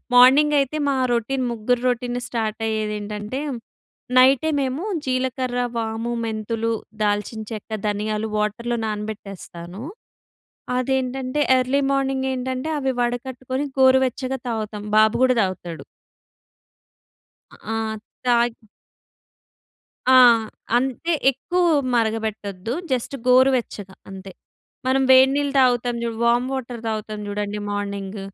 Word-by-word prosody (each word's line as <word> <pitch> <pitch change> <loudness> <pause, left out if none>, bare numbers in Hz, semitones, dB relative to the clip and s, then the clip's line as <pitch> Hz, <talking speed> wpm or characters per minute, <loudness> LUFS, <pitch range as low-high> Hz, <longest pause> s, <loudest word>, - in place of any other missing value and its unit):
Morning 275 +4 +7
అయితే 275 +2 -1
మా 275 - +1 0.2
routine 255 +3 -1
ముగ్గురు 235 +2 0
రొటీన్ 245 0 -2
స్టార్ట్ 220 -2 -2
అయ్యేదేంటంటే, 210 +2 -3 0.8
నైటే 265 +4 +5
మేము 270 +5 -2 0.2
జీలకర్ర, 255 -1 -1 0.2
వాము, 225 +1 -2
మెంతులు, 225 +1 -2 0.3
దాల్చిన 210 +2 -1
చెక్క, 215 +1 -8 0.2
ధనియాలు 210 +1 -2
వాటర్‌లో 225 +3 -1
నానబెట్టేస్తాను. 200 -3 -7 0.9
అదేంటంటే 260 +1 -1 0.2
ఎర్లీ 260 +3 +1
మార్నింగ్ 270 -1 0
ఏంటంటే 260 +3 -3
అవి 265 -1 0
వడకట్టుకొని 255 +2 -2
గోరువెచ్చగా 260 0 +3
తాగుతాం. 215 -2 -4
బాబు 215 0 +5
కూడా 255 -1 +4
తాగుతాడు. 180 -4 -4 1.8
ఆ! 225 - -5 0.5
తాగి 240 -1 +2 1.6
ఆహ్, 235 -3 +7 0.3
అంతే 265 +7 -1 0.2
ఎక్కువ 350 +7 -1 0.3
మరగబెట్టొద్దు. 220 -2 -2 0.2
జస్ట్ 255 +2 -1
గోరువెచ్చగా 250 -6 +2
అంతే. 190 0 -9 0.6
మనం 265 +1 +3
వేడినీళ్లు 270 +2 +5
తాగుతాం 245 -1 +2
చూడు 230 -1 -3
వామ్ 240 +2 +3
వాటర్ 245 -3 -5
తాగుతాం 215 -1 -4
చూడండి 205 0 -3
మార్నింగ్. 200 0 -4
240 Hz, 100 wpm, -22 LUFS, 215-260 Hz, 1.8 s, మార్నింగ్